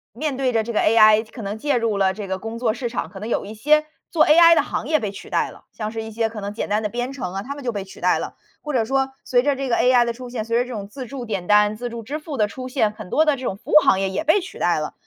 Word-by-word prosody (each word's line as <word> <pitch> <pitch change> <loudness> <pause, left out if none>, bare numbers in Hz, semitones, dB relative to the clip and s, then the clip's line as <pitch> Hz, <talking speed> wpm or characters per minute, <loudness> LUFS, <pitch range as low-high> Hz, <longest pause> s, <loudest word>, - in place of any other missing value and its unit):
面 285 +1 -2
对 260 -2 0
着 225 -1 +2
这 235 - -5
个 220 - 0
AI， 215 -1 +6
可 235 - -9
能 205 +1 -4
介 285 +4 0
入 230 -4 0
了 190 -1 +2
这 205 0 -7
个 190 0 -2
工 225 +3 -6
作 230 -2 0
市 245 +1 -4
场， 235 - -4
可 195 - -10
能 215 - -6
有 235 - -1
一 205 - -8
些 300 +7 +3 0.2
做 315 -2 +4
AI 335 +2 +7
的 - - +4
行 - - -4
业 310 - +3
被 205 -2 -2
取 - - -11
代 - - 0
了， - - -17
像 215 -1 -4
是 225 0 -4
一 220 - -7
些 225 +1 -1
可 220 -1 -8
能 200 0 -5
简 215 - -4
单 210 +1 +1
的 210 - -1
编 245 +5 -3
程 215 -10 -5
啊， 195 +1 -4
他 275 - -5
们 285 - -9
就 240 - -1
被 200 - -3
取 190 - -14
代 - - +2
了。 - - -5 0.3
或 300 - -5
者 240 -5 +1
说 270 +2 0 0.2
随 245 -1 +2
着 285 -1 +1
这 270 0 -3
个 240 - +2
AI 250 -1 +4
的 235 - -2
出 250 +1 -9
现， 235 -3 -4
随 230 +1 0
着 245 - +2
这 250 - -9
种 205 -4 -5
自 260 +4 -8
助 250 +1 -7
点 195 -5 -4
单、 210 0 +4
自 245 +3 -5
助 235 0 -6
支 275 +7 -5
付 300 -3 -7
的 210 - +2
出 255 +4 -7
现， 230 -5 +1
很 215 -3 -10
多 310 +9 +3
的 300 -2 +3
这 260 - -9
种 195 - -3
服 - - -10
务 - - -2
行 190 - +4
业 195 - 0
也 190 +11 -2
被 320 +6 +4
取 380 0 -9
代 175 -2 +1
了。 155 - -4
230 Hz, 370 characters per minute, -22 LUFS, 210-265 Hz, 0.3 s, AI